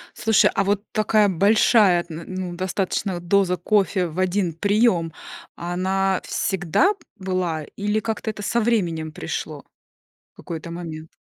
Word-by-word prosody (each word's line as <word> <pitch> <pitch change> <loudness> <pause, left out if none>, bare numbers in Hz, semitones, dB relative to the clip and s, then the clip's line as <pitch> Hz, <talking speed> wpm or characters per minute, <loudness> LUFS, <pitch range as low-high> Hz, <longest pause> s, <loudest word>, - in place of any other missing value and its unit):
Слушай, 220 -2 +3
а 195 - +1
вот 200 +1 0
такая 215 -1 +3
большая, 200 0 +4
н 165 +1 -7
ну, 185 -2 -5
достаточно 190 +1 -2
вот 175 0 -8
доза 190 -1 +3
кофе 190 0 +1
в 165 +2 -6
1 185 -1 0
прием, 195 -2 +2 0.4
она 190 +2 -1
всегда 190 - +1
б 385 - -27 0.2
была 185 -4 -2
или 210 +1 0
как-то 220 0 -3
это 210 -1 -5
со 235 - +1
временем 170 -9 0
пришло? - - -5 0.7
В - - -76
какой-то 165 0 -7
момент. 160 -2 -7
185 Hz, 145 wpm, -23 LUFS, 175-205 Hz, 0.7 s, большая